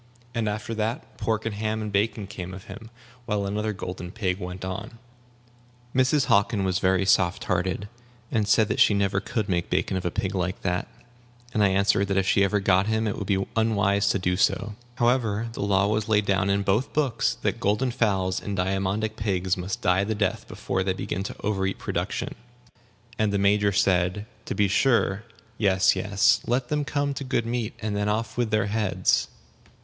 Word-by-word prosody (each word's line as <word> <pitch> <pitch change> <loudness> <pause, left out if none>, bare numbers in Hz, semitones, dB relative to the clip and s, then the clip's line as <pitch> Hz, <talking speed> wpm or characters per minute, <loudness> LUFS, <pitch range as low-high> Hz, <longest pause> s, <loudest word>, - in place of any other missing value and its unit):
And 115 -3 0
after 105 +2 -4
that, 115 +6 -4
pork 110 -1 -1
and 115 - -2
ham 110 +1 -2
and 105 -1 -4
bacon 105 +1 0
came 95 -1 -7
of 95 - -10
him, 115 -1 -10 0.4
while 105 -2 0
another 105 +2 -1
golden 90 -3 -6
pig 95 -2 -2
went 90 0 -6
on. 100 +6 -6 1.0
Mrs. 130 +2 +3
Hockin 100 0 +2
was 95 0 0
very 95 0 +2
soft 95 -1 +2
hearted, 95 +2 -1 0.4
and 110 -3 +1
said 110 0 +4
that 105 - -1
she 105 - +5
never 100 -1 +1
could 105 +1 -3
make 90 -3 -1
bacon 95 +1 0
of 95 - -2
a 90 - 0
pig 95 +3 -2
like 90 -1 -2
that; 90 -1 -1 0.7
and 105 - +2
I - - +6
answered 100 +1 +2
that 95 0 0
if 95 - +2
she 100 - +4
ever 105 +1 +2
got 95 0 +3
him 110 0 +1
it 105 - -1
would 100 - -5
be 95 0 +1
unwise 100 -3 +2
to - - +2
do 90 -1 0
so. 105 +2 +1 0.2
However, 115 -3 +1
the - - -5
law 100 -1 +2
was 105 +1 -1
laid 105 -1 +3
down 95 0 +1
in 100 0 +1
both 105 +8 0
books 115 -5 +1
that - - 0
golden 115 +4 +1
fowls 95 -6 0
and 100 -1 -4
diamondic 95 +4 -1
pigs 95 -4 0
must 95 +7 -5
die 90 +2 +3
the 110 +2 -2
death 105 -2 -1
before 95 - -3
they 95 0 0
begin 95 0 -3
to - - -5
overeat 95 -2 -1
production; - - -3 0.9
and 110 -1 +2
the 100 - +1
Major 100 +1 +3
said, 95 0 +1 0.2
"To - - -4
be 105 -1 +3
sure. 110 -1 +2 0.3
Yes, 95 -2 +4
yes. 105 +5 +3
Let 125 +1 0
them 150 -1 0
come 145 -1 -1
to 140 - -5
good 130 -3 -1
meat, 115 -1 -2
and 105 -1 -1
then 105 0 0
off 110 +1 -2
with 120 -2 0
their 110 -2 +2
heads." 105 -2 +1
100 Hz, 195 wpm, -25 LUFS, 95-110 Hz, 1.0 s, I